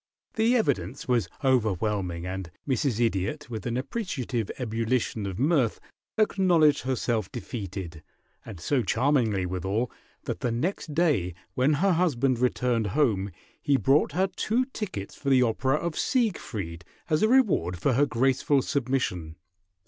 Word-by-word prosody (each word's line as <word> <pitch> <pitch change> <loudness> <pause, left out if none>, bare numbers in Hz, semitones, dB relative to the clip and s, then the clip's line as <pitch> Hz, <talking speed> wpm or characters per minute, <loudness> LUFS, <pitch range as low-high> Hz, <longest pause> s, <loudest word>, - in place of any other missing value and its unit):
The 230 +1 +3
evidence 95 - -1
was 120 -9 +1
overwhelming, 105 -8 0
and 95 -1 -5 0.2
Mrs. 130 -3 0
Idiot, 120 +5 -1
with 110 +1 -4
an 120 0 -1
appreciative 130 - -3
ebullition 115 -2 -1
of 95 -2 -5
mirth, 135 -5 +2 0.4
acknowledged 180 -8 +4
herself 120 -5 -1
defeated, 95 - -6 0.4
and 105 -7 -9
so 130 - +1
charmingly 115 -4 +1
withal, 95 +6 -2 0.3
that - - -4
the 120 - -1
next 150 +4 -2
day 140 - +2 0.2
when 130 +4 +2
her 190 +7 +2
husband 135 -8 +2
returned 125 -3 +1
home 105 -9 +2 0.3
he 140 -1 +3
brought 140 +2 +3
her 185 +4 +2
two 225 +6 0
tickets 185 - -5
for 140 - -4
the 130 -2 +5
opera 130 +4 +1
of 170 +1 -2
Siegfried 110 - -1 0.2
as 155 -1 +1
a 215 - +5
reward 195 - +3
for 130 +10 +1
her 140 +4 +3
graceful 135 +2 +2
submission. 120 - -1
125 Hz, 140 wpm, -27 LUFS, 100-150 Hz, 0.4 s, the